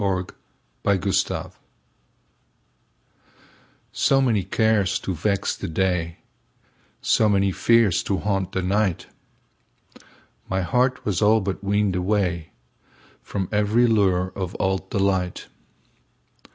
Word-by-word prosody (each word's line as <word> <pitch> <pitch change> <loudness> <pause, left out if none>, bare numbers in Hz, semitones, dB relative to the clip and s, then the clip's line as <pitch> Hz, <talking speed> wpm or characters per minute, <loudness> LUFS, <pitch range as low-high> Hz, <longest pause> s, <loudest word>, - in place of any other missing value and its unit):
Summer 95 -2 0 0.6
Magic 100 -1 0 2.4
SO 135 - +3
many 115 -7 +2
cares 100 -1 +1
to 95 - -4
vex 100 +4 -1
the - - -6
day, 85 -1 -1 0.9
So 110 - +3
many 100 -1 +2
fears 115 -3 +3
to 100 - 0
haunt 95 -2 -2
the 95 - -1
night, 95 -1 0 1.4
My 95 0 0
heart 125 +8 0
was 100 -5 -1
all 110 +2 +5
but 95 -1 -4
weaned 100 0 +1
awayFrom 90 - -4
every 105 +3 +2
lure 95 -5 +2
of 95 -2 -4
old 95 0 -1
delight. 95 -3 -1
95 Hz, 100 wpm, -23 LUFS, 95-105 Hz, 2.4 s, all